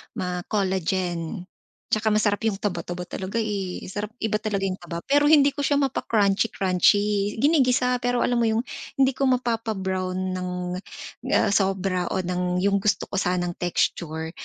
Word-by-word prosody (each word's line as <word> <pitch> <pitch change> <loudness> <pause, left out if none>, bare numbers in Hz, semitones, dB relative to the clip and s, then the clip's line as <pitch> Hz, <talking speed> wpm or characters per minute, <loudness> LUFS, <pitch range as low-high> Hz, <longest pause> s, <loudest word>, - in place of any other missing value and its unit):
ma-collagen. 180 -2 -2 0.5
Tsaka 215 0 +2
masarap 210 -1 +2
yung 215 - 0
taba-taba 180 -2 -3
talaga, 190 +5 -3
eh, 195 -4 -3
sarap 210 +2 -4
iba 220 -1 +1
talaga 210 -2 -2
yung 185 - -2
taba. 170 -1 -6
Pero 290 +1 +4
hindi 290 -2 +6
ko - - -7
siya 285 0 +2
mapa-crunchy-crunchy, 205 -3 +2
ginigisa, 255 -4 +3
pero 245 0 0
alam 245 -1 +1
mo 230 - +3
yung 220 +1 +1 0.4
hindi 265 0 +5
ko 275 - -2
mapapa-brown 190 -7 -1
ng, 180 0 -3 0.9
ah, - - +3
sobra 190 -2 +1
o 190 - 0
ng 180 0 -1
yung 200 0 +3
gusto 205 +1 +1
ko - - -6
sanang 180 -1 0
texture 160 -2 -1
200 Hz, 145 wpm, -24 LUFS, 180-225 Hz, 0.9 s, hindi